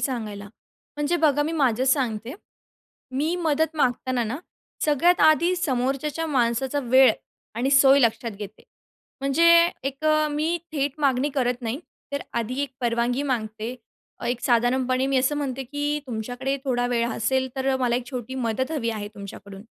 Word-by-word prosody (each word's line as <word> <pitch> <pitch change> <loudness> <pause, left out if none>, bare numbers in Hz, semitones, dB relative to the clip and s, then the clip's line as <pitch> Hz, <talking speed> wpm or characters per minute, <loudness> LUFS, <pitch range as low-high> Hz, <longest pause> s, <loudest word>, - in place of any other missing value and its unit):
सांगायला. 215 -6 -3 0.5
म्हणजे 295 +4 0
बघा, 295 -3 +3
मी 315 - -2
माझं 260 -6 +1
सांगते. 255 -3 0 0.8
मी 295 +6 -1
मदत 320 -1 0
मागताना 250 -2 0
ना, 240 +7 -4 0.5
सगळ्यात 310 +4 +3
आधी 335 +4 +5
समोरच्याचा 275 +2 -1
माणसाचा 260 0 0
वेळ 260 0 +6 0.4
आणि 255 +4 0
सोय 275 0 +6
लक्षात 230 -1 +1
घेते. 205 0 -9 0.6
म्हणजे 275 +5 +2 0.4
एक 275 +3 -4
अ, 310 0 +3
मी 310 +3 0 0.2
थेट 280 -2 0
मागणी 275 0 +2
करत 250 -2 0
नाही, 235 +5 -3 0.3
तर 280 - -2 0.2
आधी 245 +4 -3
एक 285 - -3
परवानगी 240 +2 0
मागते. 225 -3 -3 0.5
एक 245 0 -1
साधारणपणे 255 +2 +2
मी 270 0 +1
असं 275 +3 +1
म्हणते 270 -2 -3
की 290 +3 -2
तुमच्याकडे 245 +3 -3
थोडा 245 -2 0
वेळ 235 -1 0
असेल, 260 +3 0
तर 265 0 +1
मला 245 -2 +1
एक 245 - -4
छोटी 255 -1 -5
मदत 260 +5 -1
हवी 235 -7 -1
आहे 210 -2 -5
तुमच्याकडून. 200 0 -10
260 Hz, 150 wpm, -24 LUFS, 240-290 Hz, 0.8 s, वेळ